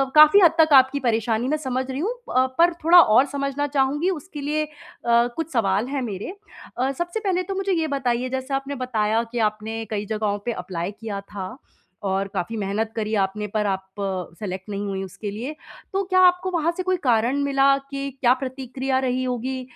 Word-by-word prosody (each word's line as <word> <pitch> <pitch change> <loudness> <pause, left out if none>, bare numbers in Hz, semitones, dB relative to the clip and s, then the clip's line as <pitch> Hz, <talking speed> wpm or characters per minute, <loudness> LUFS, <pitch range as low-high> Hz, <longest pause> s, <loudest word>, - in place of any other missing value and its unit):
काफ़ी 305 +6 +9
हद 335 - +7
तक 315 -2 +5
आपकी 265 +2 -5
परेशानी 230 -1 0
मैं 305 +3 +1
समझ 260 -3 -2
रही 265 - -4
हूँ 425 +9 -1 0.2
अ, 255 +1 +4
पर 340 +1 +5
थोड़ा 350 +2 +8
और 240 -2 +6
समझना 275 +1 -1
चाहूँगी, 285 +5 +1
उसके 310 -3 -5
लिए 305 +2 0
अ, - - -6 0.7
कुछ 325 0 -4
सवाल 210 0 +1
हैं 275 -1 -2
मेरे। 220 - -5 0.4
अ, 260 +2 +1
सबसे 345 +8 -3
पहले 370 -4 0
तो 390 +2 -5
मुझे 390 0 -1
ये 325 -2 0
बताइए 255 -3 -1
जैसे 265 +1 -4
आपने 275 +1 -2
बताया 230 -3 0
कि 240 - -2
आपने 220 +1 -6
कई 210 -1 -2
जगहों 210 -1 -1
पे 240 - 0
एप्लाई 180 +1 -4
किया 205 -2 -6
था, 195 -2 -7 0.5
और 195 0 0
काफ़ी 225 +6 -3
मेहनत 210 +2 -2
करी 220 0 -2
आपने 200 +1 -1
पर 210 +1 -1
आप 190 -1 -1 0.5
सेलेक्ट 190 -1 -5
नहीं 205 0 -3
हुई 195 -1 -3
उसके 195 +2 -6
लिए। 250 +9 -5 0.4
तो 390 - +1
क्या 370 0 +2
आपको 360 +1 +1
वहाँ 335 -1 +1
से 370 - -2
कोई 370 0 +1
कारण 240 +1 +2
मिला 275 0 +4
कि 275 0 -3
क्या 245 -1 +5
प्रतिक्रिया 260 0 -2
रही 255 0 0
होगी 255 +1 -2
255 Hz, 195 wpm, -23 LUFS, 215-295 Hz, 0.7 s, काफ़ी